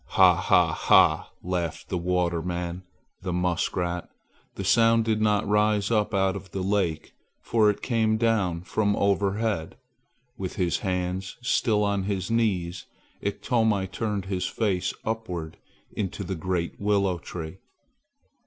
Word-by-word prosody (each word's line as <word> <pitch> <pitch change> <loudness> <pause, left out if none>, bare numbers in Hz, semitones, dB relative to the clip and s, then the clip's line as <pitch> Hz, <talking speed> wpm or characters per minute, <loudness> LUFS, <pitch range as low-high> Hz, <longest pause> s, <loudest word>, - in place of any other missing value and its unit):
"Ha! - - +7
ha! - - +3
ha!" - - +4
laughed 85 -3 -3
the 90 - -1
water 90 -1 0
man, 90 +1 -4 0.4
the 90 -1 -3
muskrat. 90 0 -1 0.5
The 95 - -4
sound 115 +4 +4
did 110 -1 +1
not 105 -2 +2
rise 105 0 +2
up 105 -2 +2
out 95 -2 +1
of 100 -1 -8
the 95 +1 -4
lake, 95 -5 -1 0.3
for 110 -2 +3
it 105 - -2
came 110 -3 +1
down 105 -7 +1
from 105 +2 0
overhead. 100 -2 0 0.6
With 95 -2 -4
his 90 -2 0
hands 90 0 -3
still 110 -3 +2
on 100 -2 0
his 95 0 -2
knees, 95 -6 0 0.3
Iktomi 105 -1 +1
turned 105 -2 -2
his 95 -2 -2
face 95 -5 0
upward 90 -8 -4 0.3
into 100 0 -3
the 95 +1 -3
great 85 0 -3
willow 100 -3 +1
tree. 85 +2 -7
95 Hz, 135 wpm, -26 LUFS, 90-105 Hz, 0.6 s, Ha